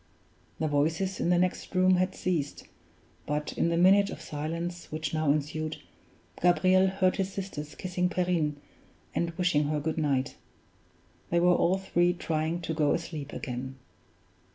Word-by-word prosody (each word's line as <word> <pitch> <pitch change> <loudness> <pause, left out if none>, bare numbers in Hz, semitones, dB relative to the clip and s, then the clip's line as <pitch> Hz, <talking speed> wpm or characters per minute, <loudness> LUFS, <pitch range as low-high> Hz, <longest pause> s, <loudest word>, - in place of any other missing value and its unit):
The 155 - +1
voices 160 +6 0
in - - 0
the 175 - +4
next 180 +1 -1
room 185 0 +5
had 185 +1 0
ceased; 160 -6 -2 0.6
but 150 0 -2
in 170 - +1
the 170 - +1
minute 195 +3 +5
of - - -7
silence 170 +4 -5
which 155 -1 -3
now 155 -2 +2
ensued, 155 +1 -2 0.6
Gabriel 185 +2 +4
heard 190 -1 +1
his 195 0 -1
sisters 185 -7 -6
kissing 180 -1 -1
Perrine, 175 -5 0 0.6
and 170 - 0
wishing 175 -5 +2
her 150 +1 0
good 160 +2 -2
night. 140 -4 0 0.9
They 170 - +2
were 180 +1 +5
all 180 +2 +3
three 175 -2 +2
trying 165 0 -2
to 165 - -3
go 150 -2 +2
asleep 155 -4 -6
again. 130 +1 -5
170 Hz, 155 wpm, -29 LUFS, 150-185 Hz, 0.9 s, room